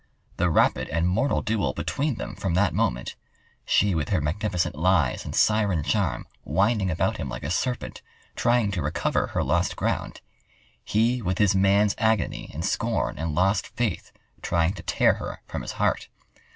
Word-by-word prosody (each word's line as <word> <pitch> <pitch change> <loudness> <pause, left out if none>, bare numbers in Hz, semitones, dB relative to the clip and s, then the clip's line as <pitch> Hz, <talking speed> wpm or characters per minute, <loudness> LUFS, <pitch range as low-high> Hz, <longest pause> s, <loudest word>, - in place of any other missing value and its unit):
The 90 +1 +2
rapid 80 - +2
and 85 +2 0
mortal 115 +10 +1
duel 100 -12 0
between 145 -1 -2
them - - -6
from 95 -4 -2
that 90 -1 +2
moment—she 90 +9 -1
with 80 -3 -1
her 95 - +2
magnificent 90 +4 -1
lies 85 -3 +2
and - - -6
siren 105 -7 +2
charm, 100 -1 0 0.2
winding 100 - +1
about 85 - 0
him 70 - -4
like 65 -1 -6
a 75 - -3
serpent, 120 +8 -2 0.3
trying 120 -3 +2
to 95 -4 -2
recover 75 +2 0
her - - -1
lost 85 +6 +1
ground; - - -2 0.6
he 120 +4 +1
with 95 -3 -1
his 105 -1 +3
man's 100 +2 +3
agony 110 -5 0
and 80 +5 -4
scorn 115 -1 -1
and 80 -2 -2
lost 95 +4 +2
faith, 115 -7 -3 0.3
trying 85 +1 +1
to - - -8
tear - - +3
her - - -7
from - - -5
his - - -6
heart. - - 0
95 Hz, 165 wpm, -25 LUFS, 85-105 Hz, 0.6 s, his